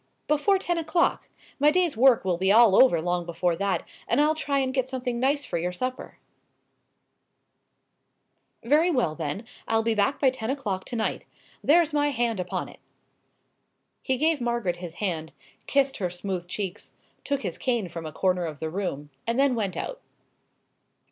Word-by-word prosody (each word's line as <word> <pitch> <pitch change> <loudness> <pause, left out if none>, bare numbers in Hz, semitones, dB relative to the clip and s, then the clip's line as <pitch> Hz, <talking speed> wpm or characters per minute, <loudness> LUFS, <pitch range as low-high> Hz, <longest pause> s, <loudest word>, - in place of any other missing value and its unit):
"Before 300 +7 +3
ten 350 -2 -1
o'clock. 330 +2 0 0.3
My 295 +2 +6
day's 345 -2 +2
work 245 -2 +5
will 180 -2 0
be 190 +1 +3
all 220 -2 +7
over 225 -10 +6
long 175 +1 -1
before 170 0 -1
that, 200 0 -1 0.2
and - - +2
I'll 300 +1 +4
try 290 -3 -1
and 260 -1 0
get 260 -1 0
something 250 -2 -3
nice 280 +3 +1
for 170 - -2
your 175 +2 -1
supper." 255 +8 -5 2.5
"Very 300 +8 +3
well, 250 - +1
then, 160 +7 -4 0.2
I'll 225 0 +2
be 230 0 +1
back 220 +7 +1
by 265 -2 +4
ten 240 -3 -5
o'clock 210 -9 -2
to - - -6
night. 220 -1 -2 0.4
There's 325 +1 +4
my 290 -1 +2
hand 235 -5 -1
upon 180 -1 -3
it." - - -14 1.2
He 260 -1 0
gave 310 0 +1
Margaret 235 -7 -1
his 175 -2 -8
hand, 165 -6 -3 0.3
kissed 275 -1 +2
her 180 -3 -1
smooth 180 0 -4
cheeks, 195 +1 -5 0.3
took 280 -1 -2
his - - -4
cane 240 -7 0
from 165 -1 -7
a - - -6
corner 180 0 0
of 155 -2 -7
the 160 +2 -4
room, 150 -6 -4 0.2
and 230 +3 0
then 275 -1 +4
went 205 -5 -2
out. - - -5
230 Hz, 175 wpm, -26 LUFS, 180-275 Hz, 2.5 s, all